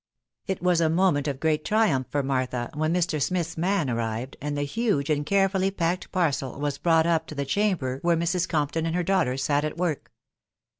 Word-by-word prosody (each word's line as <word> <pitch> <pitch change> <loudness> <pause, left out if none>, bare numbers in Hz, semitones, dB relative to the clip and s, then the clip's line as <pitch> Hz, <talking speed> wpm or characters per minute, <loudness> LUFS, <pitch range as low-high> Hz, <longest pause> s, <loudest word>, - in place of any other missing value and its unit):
It 190 -2 -3
was 180 -2 +3
a 160 - +3
moment 165 -4 +2
of 135 -2 -3
great 155 -1 +1
triumph 210 - +2
for 145 +2 -1
Martha 130 -3 -2
when 155 +1 0
Mr. 170 -3 0
Smith's 170 0 -1
man 180 -1 0
arrived, 115 +2 -3
and 145 0 -3
the 145 - 0
huge 160 -3 0
and 145 -1 +1
carefully 195 +2 +2
packed 180 -1 -2
parcel 140 -7 -1
was 145 -1 -2
brought 165 -2 +3
up 165 -1 +1
to 155 - -8
the 140 -1 -2
chamber 140 -5 0
where 170 -1 +2
Mrs. 175 +2 0
Compton 160 +1 0
and 165 - -1
her 180 - +1
daughters 165 -8 +1
sat 145 0 +1
at 155 +1 -3
work. 170 -4 -2
160 Hz, 200 wpm, -26 LUFS, 140-180 Hz, -, was